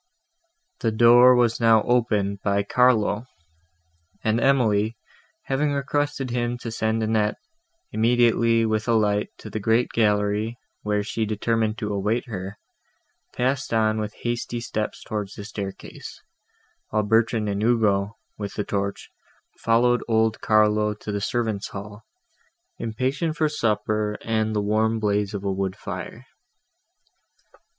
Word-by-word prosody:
The 115 - 0
door 120 +3 +7
was 120 -2 +2
now 115 -2 +5
opened 105 -5 +1
by 100 0 +1
Carlo; 115 0 +2 1.0
and 110 +1 +1
Emily, 115 -5 +2 0.5
having 145 +2 0
requested 140 -1 -1
him 120 0 -1
to 115 - -4
send 110 0 -1
Annette 110 -1 +1 0.6
immediately 115 0 +3
with 110 0 -1
a 115 - +3
light 105 -1 +1
to 110 - -10
the 110 - -3
great 115 +4 +2
gallery, 105 +1 +1 0.2
where 105 -1 0
she 110 +2 -2
determined 110 +1 0
to 105 -2 -3
await 105 +5 -1
her, 100 -3 -6 0.7
passed 130 -1 -1
on 110 -1 +2
with 105 0 -4
hasty 120 0 -2
steps 110 -2 -4
towards 105 -2 -4
the 100 - -8
staircase; 100 -2 -8 0.7
while 110 0 +1
Bertrand 110 0 +2
and 100 0 -2
Ugo, 110 -3 +1 0.2
with 100 -1 -5
the 105 - -1
torch, 100 -1 -3 0.5
followed 120 +2 +2
old 110 -1 +1
Carlo 105 0 +3
to 105 - -7
the 100 0 -2
servants' 110 -2 -1
hall, 105 +2 -9 0.8
impatient 135 +8 -2
for 155 -1 +2
supper 105 -6 -1
and 110 -1 0
the 105 - +1
warm 110 +2 +1
blaze 105 -1 0
of 100 - -5
a 100 - 0
wood 95 -1 -2
fire. - - -7
110 Hz, 135 wpm, -24 LUFS, 105-120 Hz, 1.0 s, door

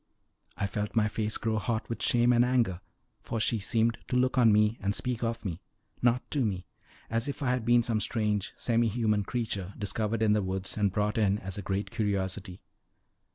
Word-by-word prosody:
I 100 - 0
felt 105 +2 -3
my 110 -2 +4
face 105 0 -2
grow 110 -1 -1
hot 110 0 -2
with 115 - -5
shame 120 0 +3
and 120 0 +5
anger, 120 -8 +1 0.4
for 115 - -3
she 110 0 +1
seemed 115 +3 +1
to - - -2
look 130 +1 +2
on 120 -4 +6
me 105 +2 +3
and 100 +2 0
speak 125 -2 -2
of 115 -1 -2
me 85 -3 -4 0.4
not 120 +1 +3
to 140 -3 +1
me 95 -5 -2 0.5
as 115 +3 0
if 145 +1 -4
I 125 - +2
had 125 -3 -1
been 120 0 +5
some 115 -2 0
strange, 105 -2 -1
semi 115 -1 +2
human 110 -2 +1
creature, 100 -4 -3
discovered 110 +1 -1
in 105 -1 +4
the 105 - +2
woods, 95 0 -2
and 105 -2 +1
brought 105 +2 0
in 100 -2 +3
as 95 -1 -5
a - - -3
great 100 +3 -2
curiosity. 100 -4 -2
110 Hz, 200 wpm, -29 LUFS, 100-120 Hz, 0.5 s, on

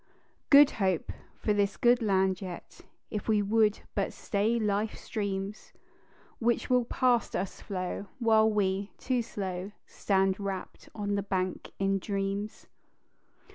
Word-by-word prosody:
"Good 285 0 +8
Hope" 190 -4 +1 0.3
for 210 - 0
this 200 -1 +1
good 240 0 +4
land 190 -3 +2
yet, 180 -3 -8 0.3
If 210 - -4
we 215 -2 +3
would 215 0 +2
but - - -1
stay 215 +3 0
life 210 0 0
streams, 200 -1 -4 0.7
Which 235 +2 0
will 250 -1 +4
past 245 -1 +1
us 190 +1 -3
flow 185 +1 -4
while 220 -2 +4
we, 200 -1 0
too 250 -2 0
slow, 190 -3 -5
Stand 195 -1 +1
rapt 195 -2 -5
on 205 -2 -2
the 200 - +1
bank 185 -2 -2
in 195 0 +1
dreams. 200 +1 -3
205 Hz, 135 wpm, -29 LUFS, 195-220 Hz, 0.7 s, Good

